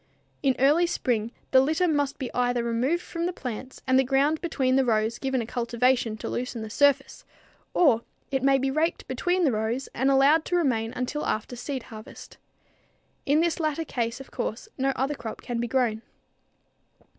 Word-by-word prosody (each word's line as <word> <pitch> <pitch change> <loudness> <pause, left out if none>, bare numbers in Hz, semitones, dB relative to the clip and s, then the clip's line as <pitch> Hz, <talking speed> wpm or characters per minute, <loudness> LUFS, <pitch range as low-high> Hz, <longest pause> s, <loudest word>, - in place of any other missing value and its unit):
In 270 -3 +2
early 300 +6 +4
spring 235 -8 -1 0.2
the 260 - +7
litter 315 +6 +1
must 290 -3 0
be 260 -4 -5
either 245 -1 +1
removed 250 +9 0
from 335 0 -3
the - - -1
plants 260 -4 -7
and 260 0 +4
the - - +4
ground 275 +4 +2
between 265 -7 +1
the 270 - +4
rows 225 -1 +1
given 265 -3 -1
a - - -6
cultivation 235 -1 0
to - - -6
loosen 240 -2 -3
the 220 - -7
surface, 285 +1 +2 0.5
or 265 -10 +4 0.3
it 270 -1 0
may 270 +1 +4
be 270 0 0
raked 315 +4 -1
between 355 +8 0
the 290 - +4
rows 225 +4 -2
and 265 +2 +1
allowed 275 +4 +5
to 355 - -1
remain 235 -9 +1
until 255 +4 -2
after 215 +3 -2
seed 260 +1 -4
harvest. 215 0 -11 0.9
In 295 +3 +4
this 340 -1 0
latter 315 0 -1
case, 235 -3 -2
of 270 - -11
course, 225 - -4
no 270 0 0
other 270 +3 0
crop 235 -5 -7
can 240 -2 -3
be 240 - -1
grown. 235 -3 0
265 Hz, 185 wpm, -26 LUFS, 235-290 Hz, 0.9 s, the